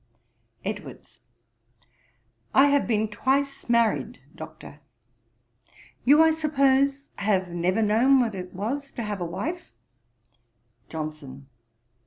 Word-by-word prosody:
EDWARDS. 135 - -7 1.3
'I 270 - +7
have 285 0 +2
been 220 -2 +1
twice 275 +5 -1
married, 225 - +1 0.2
Doctor. 155 -2 -11 1.3
You, 295 +5 +7
I 320 - +5
suppose, 275 -3 +1
have 190 -3 0
never 180 +5 0
known 240 +6 +4
what 235 -3 0
it 180 -1 -7
was 275 +9 -4
to 235 - -4
have 205 -3 -4
a - - -1
wife.' 210 - -5 1.2
JOHNSON. 150 -4 -7
220 Hz, 105 wpm, -25 LUFS, 180-275 Hz, 1.3 s, I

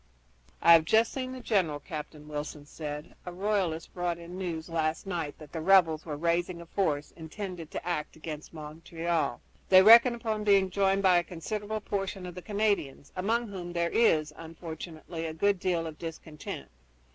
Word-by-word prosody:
"I 170 - +9
have 165 -1 +7
just 220 +6 +3
seen 255 -1 -3
the 260 - -6
general," 180 -11 +1
Captain 150 -1 -8
Wilson 150 0 -5
said. 150 +1 -7
"A 180 - -6
royalist 185 -4 -1
brought 175 -1 -1
in 170 +1 -9
news 170 -4 -4
last 160 0 -1
night 170 -6 -3
that 150 -2 -13
the 165 - -4
rebels 170 -3 +4
are 150 - -3
raising 170 +2 0
a 170 - -9
force 155 -5 -1
intended 170 0 -7
to - - -6
act 165 -4 -2
against 155 -1 -7
Montreal. 165 +2 -3 0.3
They 185 0 +9
reckon 235 +3 +9
upon 220 -2 -2
being 195 -2 +4
joined 195 +1 +2
by 185 -2 +6
a - - -2
considerable 210 +5 -4
portion 195 -2 -3
of 180 - -6
the 180 - -8
Canadians, 200 -10 -1
among 225 +5 0
whom 175 -3 -6
there 170 0 0
is, 155 -10 +3
unfortunately, 165 0 -7
a 160 - -6
good 200 +3 +2
deal 175 -3 0
of 160 -2 -7
discontent. 160 -2 -7
170 Hz, 175 wpm, -29 LUFS, 160-195 Hz, 0.3 s, I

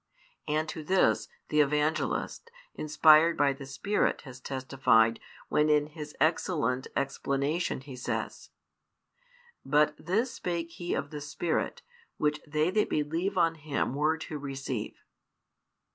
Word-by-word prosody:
And 155 +1 0
to 155 - -5
this, 185 +5 +2 0.2
the 150 - +2
Evangelist, 150 - 0 0.2
inspired 155 +2 +5
by 140 -1 +3
the 135 0 -10
Spirit, 200 +9 0
has 130 -3 -11
testified, 130 -4 +2 0.3
when 150 0 +2
in 150 -1 +4
his 150 0 -9
excellent 155 -6 +1
explanation 140 +3 -1
he 135 -1 -9
says: 125 - -4 1.1
But 150 +2 +3
this 220 +9 +1
spake 170 -1 -3
He 175 +1 -3
of - - -3
the 150 -1 -6
Spirit, 150 +3 -2 0.3
Which 150 0 0
they 155 +3 +1
that 210 +2 +1
believe 165 +6 -1
on 165 -2 +4
Him 150 -4 -2
were 155 +3 +1
to 155 -1 -6
receive. 135 -5 -5
150 Hz, 130 wpm, -29 LUFS, 140-165 Hz, 1.1 s, inspired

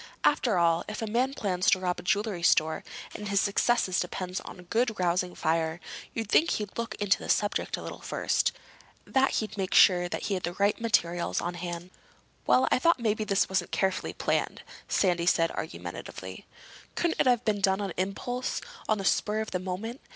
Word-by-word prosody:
After 240 -8 +3
all, 170 -1 +3
if 215 +1 -5
a - - 0
man 250 +5 0
plans 185 0 +1
to 185 - +4
rob 180 -1 -1
a - - -6
jewelry 205 -1 0
store, 160 -2 +3 0.3
and 210 - -6
his 200 -1 +3
success 215 +4 +2
depends 180 +1 -3
on - - -10
a - - -11
good 225 +4 0
rousing 180 0 0
fire, 160 +1 0 0.4
you'd 225 -2 -2
think 320 +10 +4
he'd 210 -2 -3
look 230 -2 -3
into 205 -2 +1
the - - -8
subject 205 -1 +1
a - - -8
little - - -7
first. - - 0 0.5
That 265 0 +2
he'd 215 -2 -2
make 190 0 -1
sure 180 -2 +6
he 205 - -2
had 185 - -1
the 175 0 -3
right 200 +4 +1
materials 175 -6 +1
on 175 - -3
hand." 175 0 -6 0.6
"Well, 255 - +4
I - - +4
thought 335 +1 +3
maybe 220 -2 0
this 200 -2 +2
wasn't 190 -2 -1
carefully 190 -1 -1
planned," - - -1 0.2
Sandy 175 -3 +1
said 165 -2 +3
argumentatively. 95 - -7 0.5
"Couldn't 340 -1 0
it - - +3
have 245 -1 +3
been 210 -2 +1
done 190 0 +3
on 200 -4 -3
impulse—on 245 - -3
the 195 - -4
spur 210 +2 +1
of 220 - -3
the 180 - -1
moment? 195 +7 -5
195 Hz, 190 wpm, -28 LUFS, 180-220 Hz, 0.6 s, sure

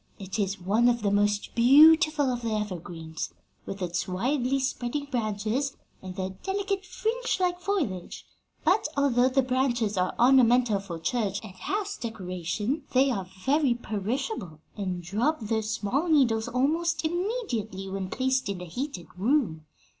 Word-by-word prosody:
It 195 +2 -5
is 200 0 -1
one 215 +7 +3
of 240 -2 0
the 200 - +2
most 205 0 +1
beautiful 295 +3 +6
of 245 - -4
the 230 -2 -2
evergreens, 170 -6 -5 0.3
with 195 -1 -5
its 175 +2 -2
widely 250 +8 0
spreading 265 +1 -2
branches 235 +2 -2 0.2
and 185 -1 -8
their 190 -1 -3
delicate, 390 0 -2
fringe 485 +3 -1
like 355 -1 +1
foliage; 325 - -3 0.4
but, 365 +4 +3
although 260 -3 +3
the 270 +1 +2
branches 245 -5 0
are 185 0 0
ornamental 245 -3 +5
for 185 -4 -6
church 200 +2 -1
and 205 -4 -9
house 410 - -3
decoration, 210 - -3
they 265 +1 +4
are 190 -6 -3 0.2
very 275 -2 +3
perishable, 215 - -3 0.2
and 185 -4 -3
drop 230 - 0
their 220 0 -1
small 220 - -1
needles 240 -8 +3
almost 310 +6 0
immediately 315 - -2
when 190 -1 -4
placed 260 -1 0
in 195 -2 -3
a 180 - -6
heated 185 - -5
room. 190 - 0
235 Hz, 145 wpm, -27 LUFS, 195-280 Hz, 0.4 s, beautiful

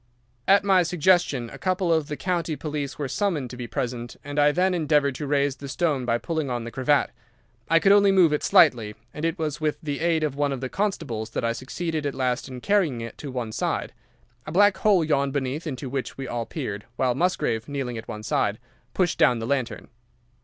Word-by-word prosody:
"At 200 +1 +6
my 190 -2 +4
suggestion 175 -7 +2
a - - -10
couple 185 -2 +1
of 160 -3 +1
the 150 - -5
county 170 -4 -1
police 145 -2 -4
were 145 - -2
summoned 145 - -1
to - - -7
be 125 -1 -6
present, 120 0 -4
and 145 +1 -3
I 145 0 +5
then 185 +4 +2
endeavoured 150 -4 +2
to 145 - -3
raise 140 -1 +1
the 140 0 -8
stone 145 -4 0
by 120 -1 +2
pulling 160 +1 -3
on 120 -2 -2
the 115 - -7
cravat. 140 +3 +2 0.6
I 165 - +5
could 195 +4 +4
only 200 -1 +6
move 180 -5 +5
it 150 - 0
slightly, 110 -3 +4 0.2
and 150 - -7
it 165 +3 -1
was 155 -2 -3
with 155 -1 0
the 145 -2 -3
aid 165 -1 +1
of 150 -3 0
one 145 0 0
of 135 - -3
the 130 0 -4
constables 150 - -2
that 115 - -3
I 115 - +1
succeeded 155 +4 -3
at 140 - -4
last 125 -1 -1
in 130 -2 -8
carrying 185 - +2
it 115 0 -7
to 145 - -6
one 125 -4 -4
side. - - -2 0.5
A - - -4
black 205 +3 +4
hole 195 -3 +4
yawned 140 -3 +1
beneath 140 +3 -2
into 135 -2 -4
which 130 0 -4
we 135 -1 -5
all 120 -1 -3
peered, 105 -10 -5
while 125 0 +1
Musgrave, 125 -8 0
kneeling 130 -5 -3
at 110 - -11
the 105 -2 -6
side, - - 0 0.4
pushed 180 -3 +1
down 120 - +5
the 115 - -4
lantern. 130 -1 -2
145 Hz, 220 wpm, -25 LUFS, 125-165 Hz, 0.6 s, At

